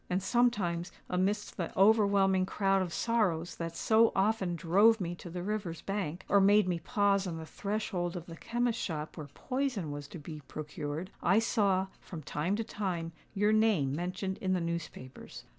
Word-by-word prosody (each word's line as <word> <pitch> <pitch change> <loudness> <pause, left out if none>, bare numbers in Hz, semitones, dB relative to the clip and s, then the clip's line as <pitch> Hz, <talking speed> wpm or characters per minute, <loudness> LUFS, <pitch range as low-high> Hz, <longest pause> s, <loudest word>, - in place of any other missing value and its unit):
And 185 +1 0
sometimes, 190 -7 +1 0.2
amidst 190 +3 0
the 170 -4 -3
overwhelming 195 -2 +4
crowd 195 -1 +1
of 180 -2 -2
sorrows 185 -7 0
that 165 0 -4
so 225 +5 +4
often 195 -3 +1
drove 200 +7 +4
me 175 -2 -2
to 175 - -9
the 175 +1 -5
river's 195 -5 -3
bank, 190 -4 -3
or 200 - +4
made 205 +1 +5
me 175 -2 0
pause 200 0 +1
on 165 -2 -4
the 160 - -7
threshold 190 -2 -3
of 170 - -7
the 165 - -9
chemist's 235 +5 -1
shop 155 -3 -4
where 155 -3 -7
poison 250 - -3
was 145 0 -6
to 175 - -9
be 155 0 -8
procured,—I 155 +5 -2
saw, 200 -4 +2
from 165 -4 -9
time 160 +8 -1
to 225 - -1
time, 180 -7 -3 0.2
your 210 +2 +3
name 205 -12 +3
mentioned 185 +3 -3
in 185 -1 0
the 185 - +1
newspapers. 170 -6 -6
185 Hz, 175 wpm, -31 LUFS, 170-210 Hz, 0.2 s, made